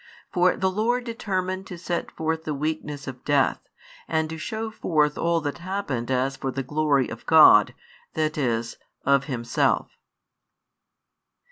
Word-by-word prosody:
For 180 0 +3
the 190 0 +1
Lord 235 +5 0
determined 190 -5 -3
to 180 - -7
set 175 0 -3
forth 160 0 -3
the 155 -2 -3
weakness 150 -1 -4
of 130 -1 -8
death, 145 -2 +2 0.5
and 160 -1 0
to 160 - -6
shew 220 +5 -4
forth 150 -8 +1
all 170 0 +1
that 145 +2 -4
happened 175 -10 -3
as 130 +1 0
for 135 - -4
the 135 +1 -3
glory 145 -1 +1
of - - -8
God, - - +7 0.4
that 155 -1 0
is, 115 -5 -1 0.3
of 140 0 +3
Himself. 120 -4 0
155 Hz, 145 wpm, -25 LUFS, 135-185 Hz, 0.5 s, God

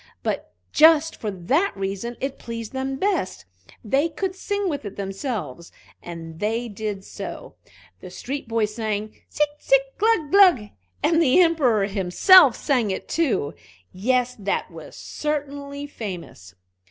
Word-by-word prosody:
But - - -3 0.2
just 320 +1 +5
for 215 - -4
that 205 - 0
reason 195 +5 -4
it 270 0 -4
pleased 230 -1 -7
them 265 0 -2
best 280 - -1 0.4
they 275 +9 +1
could 375 +3 -3
sing 405 +1 -2
with 285 -6 -3
it 205 -2 -7
themselves, 195 - -5 0.3
and 165 -2 -9
they 225 +4 -1
did 205 -2 -5
so. - - -8 0.5
The 185 - -10
street 265 +9 -6
boys 220 -2 0
sang, 215 -1 -2 0.2
"Tsi 300 - +1 0.2
tsi - - -21
tsi - - +8 0.2
glug 420 -9 +2
glug!" 360 - +5 0.3
and 330 0 +3
the 285 +1 +4
Emperor 285 - +3
himself 210 - +6
sang 250 -7 0
it 190 - -4
too. 270 - 0 0.4
Yes, 250 +5 0
that 200 -1 -2
was - - -11
certainly 285 -1 -4
famous. 180 - -8
240 Hz, 140 wpm, -23 LUFS, 200-300 Hz, 0.5 s, tsi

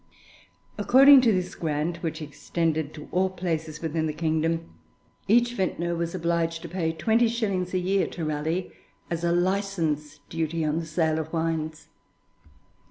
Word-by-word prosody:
According 275 +1 +8
to 240 -3 +4
this 185 -2 -1
grant, 160 +1 -2
which 160 -1 -3
extended 155 +1 -2
to 150 - -9
all 190 +1 +2
places 160 -4 -4
within 160 0 -1
the 155 - -2
kingdom, 165 +1 -1 0.6
each 240 +3 +4
vintner 175 -4 -1
was 170 +1 -3
obliged 165 -1 -1
to 170 - -7
pay 165 -2 -1
twenty 220 +9 +2
shillings 200 -6 -1
a - - +3
year 190 +2 +1
to 165 - -5
Raleigh 155 +4 -2 0.4
as 170 0 -2
a 170 - +2
license 175 -5 0
duty 165 0 -2
on 155 +2 0
the 165 - -6
sale 160 0 +1
of 160 0 -5
wines. 160 -2 -2
165 Hz, 155 wpm, -26 LUFS, 160-185 Hz, 0.6 s, According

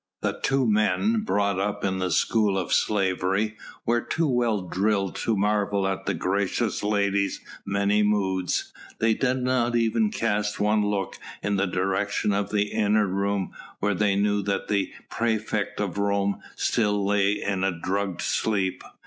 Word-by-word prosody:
The - - -1
two 135 -1 +2
men 115 - +2
brought 100 - +1
up 100 +1 -1
in 95 -1 -1
the 90 0 0
school 100 +3 +2
of 90 -3 -1
slavery, 95 +1 +1 0.3
were 120 +1 +2
too 165 +6 -1
well 120 -5 +1
drilled 95 +2 0
to 110 -2 0
marvel 100 -1 +1
at 95 0 -3
the - - +1
gracious 100 +4 -1
lady's 100 -1 +1 0.3
many 100 +1 +2
moods; 95 -4 0 0.2
they 115 0 +3
did 130 +2 0
not 125 -2 +1
even 120 - +2
cast 105 - -1
one 105 +1 +2
look 105 -2 -2 0.2
in 100 0 0
the 100 0 +1
direction 95 +3 0
of 100 0 -1
the 105 0 0
inner 105 -1 +2
room 100 0 -1 0.3
where 105 0 0
they 100 0 +2
knew 105 +1 +2
that 100 0 -2
the 100 -3 0 0.2
praefect 110 -2 -1
of 100 -2 -2
Rome 100 0 +1 0.2
still 105 -3 +1
lay 100 0 +3
in 95 -1 -1
a 95 - +3
drugged 95 +2 -2
sleep. 100 -4 0
100 Hz, 155 wpm, -25 LUFS, 95-110 Hz, 0.3 s, they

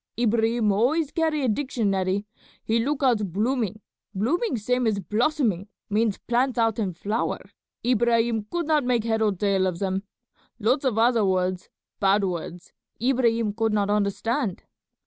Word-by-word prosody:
Ibrahim 225 -1 +2
always 275 +9 +1
carry 315 -3 0
a - - +2
dictionary; 205 -6 0 0.4
he 225 +1 +1
look 285 +2 -1
out 215 -8 +2
blooming; 215 +1 -1 0.3
blooming 265 - 0
same 250 +3 0
as 215 -2 +1
blossoming, 215 - 0 0.2
means 215 -1 +1
plants 245 +2 0
out 225 -1 +1
in 200 -4 0
flower. 210 +6 -1 0.5
Ibrahim 235 -2 +2
could 345 -1 -2
not 305 -2 +2
make 245 -3 +1
head 220 -1 0
or 215 -1 +3
tail 195 0 +1
of 180 -2 -2
them. 190 0 -1 0.6
Lots 250 +6 +1
of 245 -5 +1
other 230 -1 +4
words, 185 -1 0 0.3
bad 200 0 +3
words, 175 -1 -5 0.3
Ibrahim 235 -3 +1
could 225 0 0
not 205 -1 +1
understand." 210 +2 -1
225 Hz, 145 wpm, -25 LUFS, 200-245 Hz, 0.6 s, other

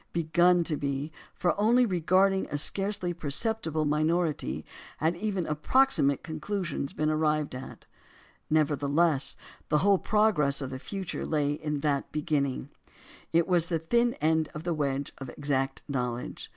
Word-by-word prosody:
Begun 170 +2 +3
to 160 -2 -2
be; 140 +2 -3 0.2
for 175 - +1
only 240 +4 +4
regarding 190 0 +2
a 145 - -3
scarcely 195 +3 +1
perceptible 160 0 -1
minority 155 +2 0 0.3
had 160 +2 +1
even 195 -2 -2
approximate 150 - +2
conclusions 160 -2 -3
been 155 0 0
arrived 155 -2 0
at. 130 +1 -9 0.6
Nevertheless 150 0 +1 0.3
the 150 - +3
whole 200 -2 +5
progress 200 -11 +2
of 135 -2 -5
the 130 - -5
future 195 +4 -5
lay 145 -2 0
in 150 -1 -3
that 140 -2 -1
beginning; 145 -3 -1 0.6
it 165 0 +3
was 175 -3 +3
the 165 - 0
thin 235 +9 +1
end 160 0 +1
of 150 - -6
the 170 0 -1
wedge 140 -2 -2
of 135 -2 -7
exact 135 -1 -2
knowledge. 125 -3 -4
155 Hz, 140 wpm, -28 LUFS, 145-180 Hz, 0.6 s, whole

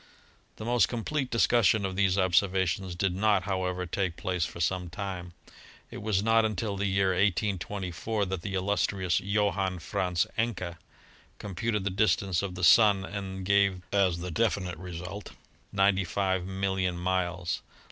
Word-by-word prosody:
The 110 - -8
most 120 0 +3
complete 130 +3 -2
discussion 115 -3 +3
of 95 -1 -3
these 95 -1 +2
observations 95 -1 +1
did 90 0 0
not, 105 +1 +2
however, 90 -2 -2
take 90 -1 -2
place 90 -5 -1
for 85 - -8
some 90 +1 -1
time. 90 -1 -6 0.6
It - - -7
was 105 -2 0
not 115 0 +4
until 105 -1 -1
the 100 +1 -1
year 95 0 +2
1824 100 +1 -1
that 95 -2 -4
the 95 +2 -4
illustrious 95 -1 0
Johann 100 -2 0
Franz 90 +1 -1
Encke 95 -7 -2 0.6
computed 105 +1 -2
the 100 - -1
distance 95 -2 +1
of 95 -2 -4
the 90 - -5
Sun 100 -1 +6
and 95 -2 -6
gave 100 -2 +2
as 95 -4 +3
the 90 +1 -5
definite 90 -3 -1
result 90 +3 -7 0.4
95,000,000 95 -1 +1
miles. 90 -1 -1
95 Hz, 140 wpm, -28 LUFS, 90-100 Hz, 0.6 s, Sun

